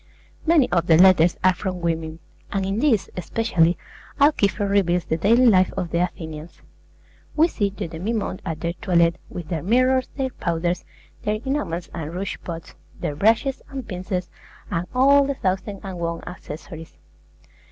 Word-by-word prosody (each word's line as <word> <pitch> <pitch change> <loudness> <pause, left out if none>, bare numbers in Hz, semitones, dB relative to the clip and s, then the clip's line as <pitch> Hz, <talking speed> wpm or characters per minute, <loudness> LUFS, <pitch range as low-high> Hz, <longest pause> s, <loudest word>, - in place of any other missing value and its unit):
Many 315 -6 +5
of 170 -1 +1
the 160 - +6
letters 180 -2 +6
are 185 0 +5
from 185 0 -4
women; 165 -2 -2 0.3
and 195 -1 -1
in 195 +3 -1
these, 245 -7 +2
especially, 180 -3 +1 0.4
Alciphron 210 -8 +3
reveals 180 -4 +2
the - - 0
daily 230 +8 +4
life 185 -6 +5
of 175 - -2
the 170 - +1
Athenians. 160 -2 -5 0.7
We 320 +2 +5
see 205 -11 -1
the 200 -1 -5
demimonde 185 +4 -3
at 160 -2 -4
their 170 0 -1
toilet, 170 -1 +2
with 170 -3 -7
their 165 -4 -2
mirrors, 255 - +2
their 265 -2 -1
powders, 170 -3 -2 0.4
their 210 - 0
enamels 265 - -2
and 160 -2 -5
rouge 195 +2 -3
pots, 165 -2 -7 0.3
their 145 - -3
brushes 225 - +2
and 265 -3 -6
pincers, 185 -1 -4 0.4
and 170 +1 -1
all 280 +2 +6
the 280 - -1
thousand 190 -1 -2
and 190 -3 -6
one 170 0 -3
accessories. 165 -2 -9
185 Hz, 160 wpm, -23 LUFS, 170-225 Hz, 0.7 s, the